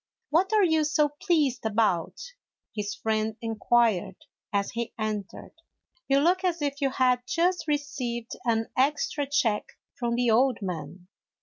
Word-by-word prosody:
" - - -59
What 365 +6 +3
are 430 -2 +4
you 320 -3 +3
so 300 0 +2
pleased 295 -5 0
about? 220 - 0 0.2
" - - -48
his 205 -1 -3
friend 220 0 -1
inquired, 225 -4 +1 0.4
as 200 -1 0
he 235 0 -4
entered; 215 -3 -4 0.5
"you 275 - +3
look 360 +5 +2
as 350 -2 0
if 285 -1 -2
you 275 - +2
had 255 -1 +2
just 355 0 +1
received 255 -6 -3
an 225 -2 0
extra 285 +1 +1
check 235 -7 0 0.2
from 235 -1 -2
the 240 -1 +2
old 250 +2 +3
man." 175 0 -6
245 Hz, 150 wpm, -27 LUFS, 220-295 Hz, 0.5 s, are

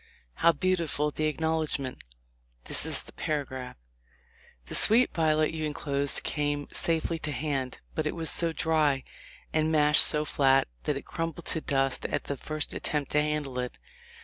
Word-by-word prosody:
How 170 - +5
beautiful 165 -3 0
the 155 +1 -1
acknowledg 160 0 -1
ment 130 -2 -6 0.3
!" - - -40
This - - +3
is - - 0
a - - -12
paragraph: 130 -4 -4 0.9
"The - - -9
sweet 235 +4 +5
violet 155 -2 +2
you 160 -1 -4
enclosed 140 -2 -1
came 145 -1 -2
safely 165 0 0
to 150 - -3
hand, 135 -3 -3 0.2
but 155 -1 -1
it - - -3
was 165 -2 +1
so 170 -1 +3
dry, 155 -4 +1 0.5
and 155 0 +1
mashed 150 -1 +6
so 150 0 +2
flat, 135 -2 +3 0.2
that - - 0
it - - -8
crumbled 165 0 -5
to 160 - -3
dust 135 -2 0
at 145 - -2
the 140 - -4
first 155 +3 -4
attempt 145 -2 -3
to 150 - +3
handle 150 -4 -2
it. 125 0 -4
150 Hz, 170 wpm, -28 LUFS, 140-160 Hz, 0.9 s, mashed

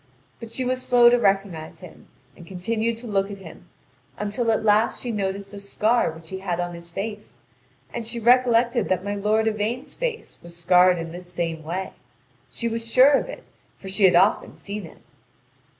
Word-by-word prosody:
But 230 - -9
she 255 +3 -3
was 255 0 -1
slow 240 -2 +5
to 245 - +4
recognise 195 -6 -1
him, - - -14 0.3
and 170 - -14
continued 225 +5 -2
to 235 - -10
look 200 -3 0
at 200 - -7
him 175 -1 -13 0.5
until 215 +3 -2
at 220 - +1
last 215 +1 +3
she 245 - -4
noticed 200 -1 -3
a 200 - -7
scar 215 +3 +1
which 160 0 -13
he 190 - -5
had 180 -3 -3
on 175 0 -3
his 170 0 -10
face, 205 - -7 0.5
and 240 - -4
she 235 +1 -3
recollected 240 -1 +3
that 185 -1 0
my 205 - -2
lord 215 +2 +1
Yvain's 220 +6 -2
face 485 -3 -5
was 170 0 -10
scarred 180 +1 +4
in 165 -1 -5
this 180 +1 -10
same 165 -2 -3
way; 180 +4 -5 0.6
she 235 - -4
was 230 0 -3
sure 260 +4 +7
of 285 - +1
it, - - -10 0.3
for 195 - -9
she 195 +1 +2
had 180 -2 +5
often 190 +5 +3
seen 200 -3 -7
it. - - -19
205 Hz, 195 wpm, -23 LUFS, 180-230 Hz, 0.6 s, sure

